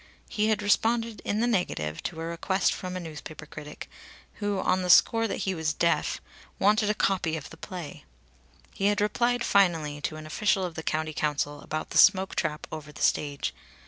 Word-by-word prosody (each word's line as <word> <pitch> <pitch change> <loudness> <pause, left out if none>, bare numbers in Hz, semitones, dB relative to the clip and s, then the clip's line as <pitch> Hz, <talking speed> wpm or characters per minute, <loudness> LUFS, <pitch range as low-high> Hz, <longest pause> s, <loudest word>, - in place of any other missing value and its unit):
He 215 0 0
had 220 -1 +1
responded 225 +1 +1
in 210 +2 -1
the - - +3
negative 130 - -1
to 160 - -4
a - - -3
request 170 +3 0
from 185 0 -5
a - - -3
newspaper 155 -2 -8
critic 150 -1 -9 0.5
who, 205 -2 -1
on 185 0 +1
the 180 - -3
score 225 +5 +6
that - - -3
he 190 - 0
was 160 -3 -1
deaf, 170 0 +1 0.4
wanted 210 +1 +3
a 215 - +1
copy 185 -6 +1
of 150 - -9
the 165 - -11
play. 175 -3 -8 0.7
He 200 - 0
had 205 0 +2
replied 240 +4 +1
finally 165 -7 +2
to 155 - -3
an 155 0 -8
official 190 +4 +1
of 175 - -5
the 160 - -5
County 155 0 -2
Council 145 -1 -1
about 155 0 -5
the - - +3
smoke 190 -2 +5
trap 155 -2 -2
over 150 -1 -7
the - - -6
stage. 145 -1 0
180 Hz, 195 wpm, -27 LUFS, 155-205 Hz, 0.7 s, score